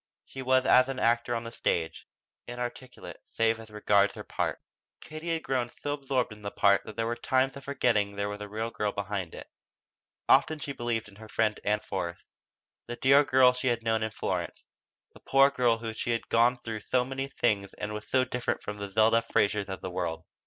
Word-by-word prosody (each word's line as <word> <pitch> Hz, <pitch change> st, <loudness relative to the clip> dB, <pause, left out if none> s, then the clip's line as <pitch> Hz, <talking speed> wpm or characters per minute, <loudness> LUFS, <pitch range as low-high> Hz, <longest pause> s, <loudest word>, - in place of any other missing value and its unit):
She 135 Hz, -, -8 dB
was 130 Hz, 0 st, +3 dB
as 130 Hz, +1 st, +5 dB
an 135 Hz, -, -3 dB
actor 120 Hz, +1 st, +2 dB
on 115 Hz, -, -3 dB
the 115 Hz, -, -7 dB
stage, 80 Hz, -7 st, -2 dB, 0.4 s
inarticulate 120 Hz, +1 st, -7 dB
save 115 Hz, 0 st, +1 dB
as 110 Hz, -1 st, -11 dB
regards 105 Hz, -1 st, +2 dB
her -, -, -7 dB
part. -, -, -2 dB, 0.4 s
Katie 155 Hz, +2 st, -6 dB
had 160 Hz, -, -3 dB
grown 125 Hz, -2 st, -1 dB
so 145 Hz, +3 st, -4 dB
absorbed 135 Hz, -5 st, -1 dB
in 105 Hz, -, -15 dB
that 100 Hz, 0 st, -6 dB
part 100 Hz, -1 st, +4 dB
that 110 Hz, -, -9 dB
there 115 Hz, -, -1 dB
were 120 Hz, +1 st, -1 dB
times 130 Hz, +2 st, +1 dB
of 140 Hz, -, -10 dB
forgetting 110 Hz, -7 st, +1 dB
there 100 Hz, 0 st, -1 dB
was 105 Hz, 0 st, -6 dB
a 105 Hz, -, -6 dB
real 110 Hz, +2 st, -3 dB
girl 105 Hz, -2 st, -1 dB
behind 100 Hz, -4 st, -4 dB
it. -, -, -9 dB, 0.8 s
Often 155 Hz, -, +4 dB
she 145 Hz, -1 st, -5 dB
believed 120 Hz, -4 st, -2 dB
in 100 Hz, -1 st, -16 dB
her 110 Hz, 0 st, -12 dB
friend 105 Hz, -1 st, 0 dB
Ann 105 Hz, +1 st, +1 dB
Forrest, 85 Hz, -2 st, -5 dB, 0.6 s
the 120 Hz, -, -4 dB
dear 140 Hz, +3 st, +5 dB
girl 130 Hz, -2 st, +5 dB
she 125 Hz, +1 st, -3 dB
had 120 Hz, -2 st, 0 dB
known 110 Hz, -1 st, +1 dB
in 110 Hz, -, -1 dB
Florence, -, -, -4 dB, 0.5 s
the -, -, -15 dB
poor 135 Hz, +1 st, +4 dB
child 120 Hz, -4 st, +2 dB
who 115 Hz, -1 st, -4 dB, 0.2 s
had 115 Hz, -1 st, -1 dB
gone 120 Hz, +2 st, +4 dB
through 115 Hz, -2 st, -5 dB
so 125 Hz, +3 st, 0 dB
many 135 Hz, +1 st, -3 dB
hard 135 Hz, -, -15 dB
things 100 Hz, -4 st, 0 dB
and 105 Hz, 0 st, -5 dB
was 105 Hz, 0 st, -7 dB
so 130 Hz, -1 st, +3 dB
different 125 Hz, 0 st, -2 dB
from 105 Hz, 0 st, -5 dB
the 100 Hz, 0 st, -5 dB
Zelda 110 Hz, +3 st, +4 dB
Frasers 100 Hz, -3 st, 0 dB
of 95 Hz, -2 st, -5 dB
the 95 Hz, -, -5 dB
world. 80 Hz, -2 st, -3 dB
115 Hz, 215 wpm, -28 LUFS, 105-130 Hz, 0.8 s, as